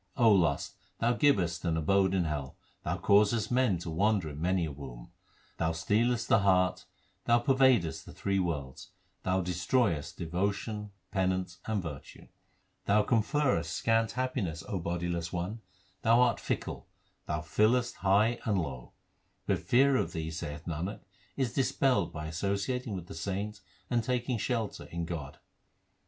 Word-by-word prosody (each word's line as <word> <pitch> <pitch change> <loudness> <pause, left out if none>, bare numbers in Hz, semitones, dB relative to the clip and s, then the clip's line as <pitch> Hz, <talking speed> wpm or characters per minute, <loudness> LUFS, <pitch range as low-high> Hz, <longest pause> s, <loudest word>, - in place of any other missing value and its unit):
O 115 -4 +6
lust, 85 -8 +2 0.2
thou 120 +1 +2
givest 95 - +2
an 85 -2 0
abode 95 +4 +2
in 90 - +2
hell; 75 -4 -4 0.2
thou - - -2
causest 105 +2 +3
man 125 -7 +3
to 85 0 -6
wander 100 0 +1
in 75 +1 -8
many 90 0 +1
a 75 - -4
womb; 65 -4 -10 0.5
Thou 80 0 0
stealest 115 +8 +1
the 110 - +5
heart, 90 -2 +2 0.4
thou 120 - +5
pervadest 130 - +3
the - - -8
three 100 -1 -1
worlds, 80 0 -3 0.3
thou 95 0 +1
destroyest 90 - 0
devotion, 100 +5 -2 0.2
penance, 95 -2 -1
and 105 -4 -1
virtue; 75 -5 -8 0.6
Thou 105 +1 +4
conferrest 115 - +1
scant 115 0 +1
happiness, 120 - -2
O 95 - -2
bodiless 85 0 -2
2 90 - -4
one, 100 +6 -4 0.4
thou 115 +2 +5
art 125 -1 +3
fickle, - - -4 0.4
thou 75 - -1
fillest 110 +10 +2
high 105 +5 +3
and 105 -3 +1
low; 65 -7 -5 0.5
But - - +1
fear 135 +2 +4
of - - -1
thee, 80 -2 -3
saith 75 -1 -6
Nanak, 85 +5 -4 0.4
is 130 -4 0
dispelled 130 - +2
by 75 -1 -6
associating 100 +8 -2
with 90 -3 -6
the - - -9
saints 100 +5 -4 0.3
and 120 -2 +1
taking 125 0 -1
shelter 115 -2 -2
in 85 0 -4
God. 80 -5 -6
95 Hz, 150 wpm, -30 LUFS, 85-115 Hz, 0.6 s, O